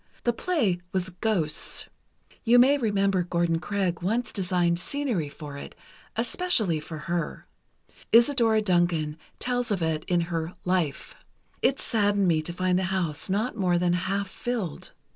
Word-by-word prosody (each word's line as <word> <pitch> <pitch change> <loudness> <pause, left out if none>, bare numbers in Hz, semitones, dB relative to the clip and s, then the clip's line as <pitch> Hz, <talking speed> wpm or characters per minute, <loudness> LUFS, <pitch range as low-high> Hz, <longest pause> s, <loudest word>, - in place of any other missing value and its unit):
The 240 - +2
play 230 - 0
was 185 -1 -1
'Ghosts.' 175 -5 0 0.6
You 240 +1 +5
may 260 +4 +6
remember 200 -5 +1
Gordon 170 -1 0
Craig 185 -2 -2
once 220 +5 -1
designed 180 -3 +1
scenery 235 - -1
for 145 -1 -9
it, - - -10 0.4
especially 230 - +1
for 155 +1 -7
her. 170 +2 -3 0.7
Isadora 230 -3 +5
Duncan 175 -5 +1 0.2
tells 245 -1 -1
of 195 -5 0
it 160 -1 -1
in 175 -1 +1
her 170 0 -3
'Life.' 180 -6 -1 0.5
It 275 - +2
saddened 205 -3 +1
me 160 -2 +3
to 155 - -3
find 185 +1 +1
the 190 - -1
house 180 -4 -1
not 215 +6 0
more 180 -4 +2
than 175 0 +2
half 195 +3 -1
filled. 215 -6 -4
185 Hz, 145 wpm, -26 LUFS, 170-220 Hz, 0.7 s, may